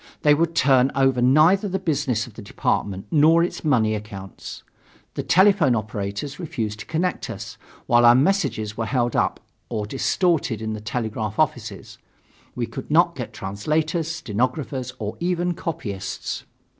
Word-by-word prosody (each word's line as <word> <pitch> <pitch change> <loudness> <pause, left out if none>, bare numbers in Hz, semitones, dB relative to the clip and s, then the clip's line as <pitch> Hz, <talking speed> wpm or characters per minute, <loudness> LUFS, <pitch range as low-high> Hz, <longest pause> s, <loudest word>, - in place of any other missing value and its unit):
They 150 - +6
would 165 +2 +1
turn 130 -1 +4
over 135 -2 +3
neither 160 +11 +4
the 190 - -1
business 145 - -1
of 120 - -14
the 115 - -10
department 100 -1 -2
nor 160 +2 +5
its 175 - -3
money 120 -8 +2
accounts. 100 -3 -8 0.5
The - - -3
telephone 185 - +4
operators 105 - -4
refused 110 - -4
to - - -9
connect 170 +3 -1
us, - - -7 0.3
while 120 0 +4
our 120 0 +8
messages 130 - +1
were 115 - -2
either - - -6
held 120 -2 +1
up - - +1 0.3
or 110 -3 -2
distorted 135 - 0
in 110 0 -3
the 110 - -6
telegraph 110 -1 -3
offices. 115 -9 -2 0.6
We - - -1
could - - -8
not - - +4
get - - -5
translators, 155 - -1
stenographers 130 -2 -2
or 105 0 -5
even 175 0 0
copyists. 110 - -5
125 Hz, 155 wpm, -23 LUFS, 110-160 Hz, 0.6 s, our